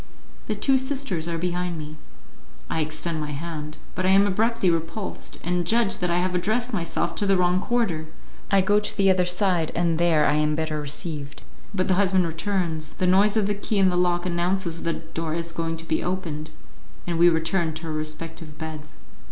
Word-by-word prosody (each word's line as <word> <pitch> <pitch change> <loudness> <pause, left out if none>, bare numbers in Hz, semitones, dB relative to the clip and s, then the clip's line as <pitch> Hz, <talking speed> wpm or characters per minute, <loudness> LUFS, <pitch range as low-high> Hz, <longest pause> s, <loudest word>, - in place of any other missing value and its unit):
The 215 - -1
two 265 +5 +3
sisters 265 - -1
are 170 -1 -1
behind 175 0 -2
me. 155 0 -7 0.8
I 160 - +1
extend 155 +1 -2
my 150 -1 -4
hand; 155 0 -5 0.2
but 185 - -2
I 185 - +3
am 195 +1 +6
abruptly 215 0 +2
repulsed, 165 +5 -4
and 175 +1 0
judge 225 +2 +2
that 180 - -1
I 170 - +2
have 180 +1 0
addressed 220 +7 0
myself 170 -5 -1
to 205 - 0
the 195 -1 +4
wrong 180 0 +3
quarter; 190 -9 0 0.4
I 195 -1 +5
go 205 +2 +3
to 210 - -3
the 195 -1 +5
other 185 -1 +3
side, 180 -2 +1
and 170 -1 +1
there 165 -3 +4
I 145 - +3
am 150 0 +2
better 155 -1 -2
received. 145 0 -5 0.3
But 185 -3 0
the 190 - +3
husband 190 -2 +3
returns, 165 -1 -2
the 185 - -1
noise 200 +4 +4
of 215 - +3
the 205 - +1
key 205 +1 -2
in 190 -2 +5
the - - -1
lock 175 0 +2
announces 175 -1 -1
that 165 - 0
the 160 0 -10
door 165 -1 -2
is 170 0 -2
going 165 0 -2
to 165 - -8
be 160 - 0
opened, 160 -4 -3 0.6
and 170 -2 -2
we 175 +1 +7
return 160 0 0
to 160 +1 -7
our 160 - -3
respective 155 0 -4
beds. 155 -1 -7
175 Hz, 205 wpm, -25 LUFS, 160-190 Hz, 0.8 s, we